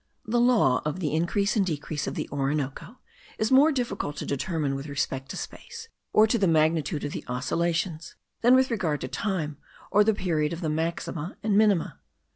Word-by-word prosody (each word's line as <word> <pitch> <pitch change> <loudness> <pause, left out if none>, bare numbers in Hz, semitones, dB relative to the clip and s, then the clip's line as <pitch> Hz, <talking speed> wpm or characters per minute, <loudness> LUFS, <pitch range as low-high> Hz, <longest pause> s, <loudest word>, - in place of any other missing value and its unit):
The 240 +3 +1
law 235 - +4
of 150 +4 -3
the 150 -5 -1
increase 190 +6 +1
and 210 - +3
decrease 155 -3 -3
of - - -3
the - - -3
Orinoco 145 - -2 0.4
is 215 +2 0
more 280 +4 +6
difficult 240 - -2
to - - -4
determine 145 0 -1
with 135 +2 -5
respect 135 -1 -3
to - - -5
space, 460 -1 -8 0.2
or 215 - +6
to 225 +1 +1
the 195 - +3
magnitude 155 -2 +2
of 145 - -3
the - - -5
oscillations, 160 +6 -2 0.3
than 245 +2 +6
with 260 -1 +3
regard 165 - -1
to - - -3
time, 155 0 -2 0.3
or 210 +2 +5
the 220 0 +2
period 160 -5 0
of 170 - -6
the 160 - -1
maxima 165 +1 -3
and 210 -2 +1
minima. 205 -5 +2
165 Hz, 190 wpm, -26 LUFS, 150-210 Hz, 0.4 s, more